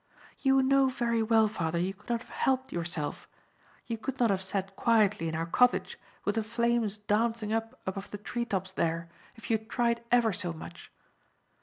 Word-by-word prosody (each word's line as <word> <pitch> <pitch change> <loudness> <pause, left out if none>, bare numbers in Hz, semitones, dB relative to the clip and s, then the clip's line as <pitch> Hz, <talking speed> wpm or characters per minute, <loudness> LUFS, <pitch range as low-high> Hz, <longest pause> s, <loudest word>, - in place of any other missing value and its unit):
"You 270 -1 +4
know 270 0 +4
very 235 -3 0
well, 220 0 +4
father, 170 -6 -2
you 180 +3 0
could 210 +4 -20
not 235 -1 0
have - - -15
helped 260 0 0
yourself. 170 -3 -3 0.6
You 230 -2 -4
could 270 +3 -4
not 235 -4 +4
have 190 -1 0
sat 195 0 -2
quietly 210 -7 +3
in 160 - -3
our 165 +1 -1
cottage 250 +9 +2 0.3
with 205 - +2
the 225 0 0
flames 230 -1 0
dancing 215 +1 0
up 225 +3 -2
above 195 +1 -4
the 205 - -6
tree 235 +4 -3
tops 190 -4 -2
there, 165 -2 -1 0.3
if 225 - -7
you 220 - +3
had 220 +1 -21
tried 235 -1 +1
ever 235 -3 +4
so 180 -3 -1
much. 160 - -10
220 Hz, 190 wpm, -30 LUFS, 190-235 Hz, 0.6 s, You